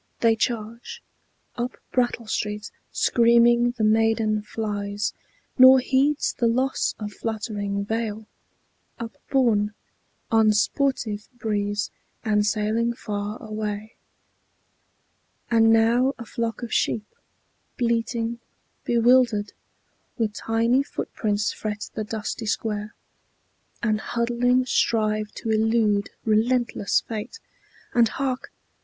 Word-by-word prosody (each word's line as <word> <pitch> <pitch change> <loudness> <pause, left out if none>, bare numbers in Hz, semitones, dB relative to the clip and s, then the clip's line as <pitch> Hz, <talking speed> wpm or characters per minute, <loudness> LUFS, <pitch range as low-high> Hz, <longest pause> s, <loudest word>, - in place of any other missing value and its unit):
They 230 -1 +4
charge 235 - -3 0.5
Up 245 +1 -3
Brattle 240 -2 0
Street. 210 -1 -3 0.2
Screaming 235 0 +4
the 220 - 0
maiden 220 0 +2
flies, 205 -1 -3 0.5
Nor 260 +1 +10
heeds 270 +3 +1
the 235 - +1
loss 255 +3 0
of 210 -1 -6
fluttering 205 -3 -3
veil, 220 0 -3 0.7
upborne 230 -2 0 0.6
On 220 -1 +5
sportive 215 -1 0
breeze, 205 -2 -1 0.3
and 210 -1 +3
sailing 215 +3 0
far 205 -1 -4
away. 215 0 -4 1.6
And 225 -1 +5
now 235 +4 +3
a 235 - -8
flock 230 +2 -3
of 235 - -5
sheep, 215 -2 +1 0.7
bleating, 235 -1 -1 0.4
bewildered, 235 -3 +3 0.6
With 220 -3 0
tiny 230 +5 +1
footprints 210 -6 -2
fret 210 -1 -5
the 215 - -3
dusty 220 +1 -4
square, 210 -1 -2 0.9
And 215 -2 +1
huddling 245 +2 +1
strive 215 -3 +1
to 225 - -4
elude 220 -2 +2 0.2
relentless 225 0 +2
fate. 220 - -6 0.6
And 235 -2 +4
hark! 260 0 -3
225 Hz, 100 wpm, -24 LUFS, 210-235 Hz, 1.6 s, Nor